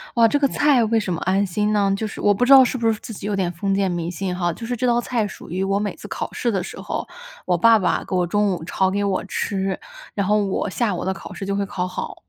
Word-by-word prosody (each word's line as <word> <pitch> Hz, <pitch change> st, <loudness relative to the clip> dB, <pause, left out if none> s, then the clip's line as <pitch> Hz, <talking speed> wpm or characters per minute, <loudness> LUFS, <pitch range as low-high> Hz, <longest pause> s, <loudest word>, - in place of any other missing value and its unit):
哇， 230 Hz, -1 st, +6 dB
这 260 Hz, -, +2 dB
个 285 Hz, -1 st, +3 dB
菜 275 Hz, -3 st, +3 dB
为 225 Hz, +1 st, +2 dB
什 190 Hz, -, -3 dB
么 170 Hz, -, -2 dB
安 190 Hz, +2 st, +2 dB
心 210 Hz, +3 st, 0 dB
呢？ 200 Hz, -2 st, +2 dB
就 220 Hz, -, -2 dB
是 210 Hz, -, -6 dB
我 205 Hz, -, +4 dB
不 245 Hz, +5 st, +1 dB
知 275 Hz, -, +7 dB
道 265 Hz, -, +10 dB
是 255 Hz, -, -1 dB
不 230 Hz, -2 st, 0 dB
是 215 Hz, -, -4 dB
自 -, -, -8 dB
己 195 Hz, -, -8 dB
有 205 Hz, -1 st, -1 dB
点 185 Hz, -3 st, 0 dB
封 195 Hz, +3 st, -2 dB
建 195 Hz, -1 st, +1 dB
迷 175 Hz, -1 st, -2 dB
信 180 Hz, +1 st, -3 dB
哈， 175 Hz, -2 st, 0 dB
就 -, -, -10 dB
是 245 Hz, -, -1 dB
这 250 Hz, -, -1 dB
道 240 Hz, 0 st, +3 dB
菜 235 Hz, -3 st, -1 dB
属 -, -, -11 dB
于 185 Hz, +2 st, -2 dB
我 195 Hz, +1 st, +1 dB
每 205 Hz, 0 st, -3 dB
次 -, -, -10 dB
考 -, -, -4 dB
试 240 Hz, -, -1 dB
的 195 Hz, -3 st, 0 dB
时 -, -, -8 dB
候， -, -, -4 dB, 0.4 s
我 175 Hz, -, +2 dB
爸 225 Hz, +5 st, +6 dB
爸 180 Hz, -, 0 dB
给 190 Hz, -, -2 dB
我 180 Hz, -1 st, +1 dB
中 205 Hz, +3 st, +1 dB
午 170 Hz, -, -5 dB
炒 190 Hz, +3 st, 0 dB
给 200 Hz, +1 st, 0 dB
我 190 Hz, -2 st, -1 dB
吃， 195 Hz, -1 st, -2 dB, 0.3 s
然 200 Hz, -2 st, -1 dB
后 210 Hz, +1 st, +3 dB
我 195 Hz, +1 st, -1 dB
下 215 Hz, +1 st, 0 dB
午 175 Hz, -, -4 dB
的 190 Hz, -, 0 dB
考 -, -, -9 dB
试 195 Hz, -, -6 dB
就 200 Hz, -, -1 dB
会 200 Hz, 0 st, 0 dB
考 185 Hz, -2 st, -3 dB
好。 185 Hz, -, -5 dB
200 Hz, 320 characters per minute, -22 LUFS, 185-225 Hz, 0.4 s, 道